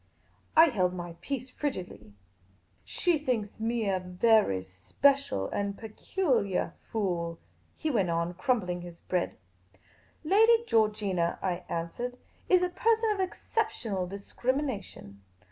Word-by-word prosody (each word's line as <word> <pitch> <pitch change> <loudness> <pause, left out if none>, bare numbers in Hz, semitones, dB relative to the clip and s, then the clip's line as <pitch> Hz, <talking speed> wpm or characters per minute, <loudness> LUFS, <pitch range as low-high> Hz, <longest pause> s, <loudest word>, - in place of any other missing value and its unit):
I 325 +1 +9
held 185 -7 +1
my 175 -1 -6
peace 260 +4 -4
frigidly. 180 - -5 0.4
" 95 - -34 0.3
She 350 -4 +1
thinks 230 -8 -2
me 225 -1 0
a 190 -1 +1
very 180 - +3
special 95 - +1
and 200 0 -2
peculiah 220 - -1 0.2
fool," 175 -6 -1 0.4
he 315 - -1
went 200 -8 +1
on, 170 +1 0
crumbling 180 -3 0
his 175 -1 -10
bread. 180 -1 -1 0.5
" - - -32
Lady 450 +7 +5
Georgina," 210 - +1
I 180 -1 -2
answered, 240 +10 -3 0.3
"is 365 -1 +5
a 360 - +1
person 450 +3 +2
of 410 - -2
excep 435 +4 -1
tional 195 - -3
discrimination. 200 - -3
210 Hz, 130 wpm, -29 LUFS, 180-280 Hz, 0.5 s, I